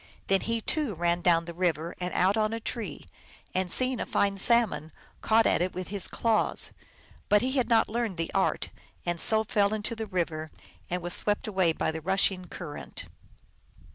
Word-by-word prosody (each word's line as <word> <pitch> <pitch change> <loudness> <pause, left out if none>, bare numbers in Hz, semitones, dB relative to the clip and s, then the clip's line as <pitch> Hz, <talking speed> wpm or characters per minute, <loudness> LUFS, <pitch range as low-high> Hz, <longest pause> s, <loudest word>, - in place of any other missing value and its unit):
Then 195 0 +2
he, 230 0 -1
too, 285 - -1
ran 170 +1 0
down 170 -2 +4
40 - - -14
the 170 - -7
river 170 -1 -1
and 180 0 -3
out 190 +3 +3
on 215 0 +1
a 225 - -2
tree, 220 - -5 0.5
and, 185 -1 0
seeing 255 -1 +3
a - - -2
fine 200 -1 +1
salmon, 220 -8 +3 0.3
caught 225 0 +4
at - - +2
it 180 +1 -1
with 185 0 -5
his 200 -1 -1
claws. 225 -2 0 0.6
But 210 +2 +4
he 260 - 0
had 260 -3 0
not 225 -1 +4
learned 225 -4 -2
the 165 0 -3
art, 195 - 0 0.3
and 175 -1 -1
so 220 0 +4
fell 205 -1 +1
into 215 +2 -1
the 220 -1 -5
river, 165 -4 -2 0.4
and 180 0 -2
was 175 0 -2
swept 205 0 +2
away 190 -5 +2
by 160 - -1
the 160 0 -6
rushing 190 +1 +1
current. 165 -5 -7
195 Hz, 195 wpm, -28 LUFS, 175-220 Hz, 0.6 s, down